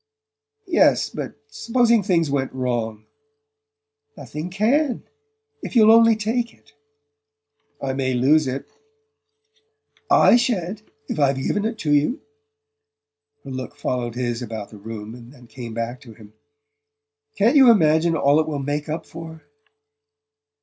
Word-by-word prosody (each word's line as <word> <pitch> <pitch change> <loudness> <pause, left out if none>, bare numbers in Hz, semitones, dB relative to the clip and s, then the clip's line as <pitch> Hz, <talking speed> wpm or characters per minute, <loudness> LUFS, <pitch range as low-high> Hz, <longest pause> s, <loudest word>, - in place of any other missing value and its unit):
"Yes; 365 -3 +3
but - - -6 0.2
supposing 235 - +2
things 170 -6 +1
went 135 -2 -1
wrong?" 115 -4 -3 1.1
"Nothing 155 +4 -7
CAN 240 - +1 0.6
if - - -7
you'll 220 -2 +7
only 230 0 +6
take 225 +2 -2
it..." - - -27 1.1
"I 135 -1 -3
may 130 -1 -1
lose 140 +4 +3
it 130 +1 -4 0.8
" 440 0 -41 0.2
"I - - +7
sha'n't, 215 -5 -2 0.3
if - - -4
I've 140 -1 +3
given 205 +10 -1
it 225 0 -2
to 150 - +2
you!" 150 - +1 1.2
Her 135 - -9
look 130 +2 -6
followed 125 -4 -3
his 120 -1 -2
about 110 -3 -6
the 105 - -12
room 110 0 -8
and 120 0 -13
then 125 -3 -17
came 115 -1 -9
back 115 +2 -4
to 115 -5 -14
him. 105 -1 -16 1.0
"Can't 230 +8 +3
you 265 -3 +8
imagine 165 -5 +4
all 145 0 +3
it 160 - 0
will 150 -2 -3
make 145 +2 -3
up 155 +2 -4
for?" 160 -1 -10
150 Hz, 140 wpm, -22 LUFS, -, 1.2 s, you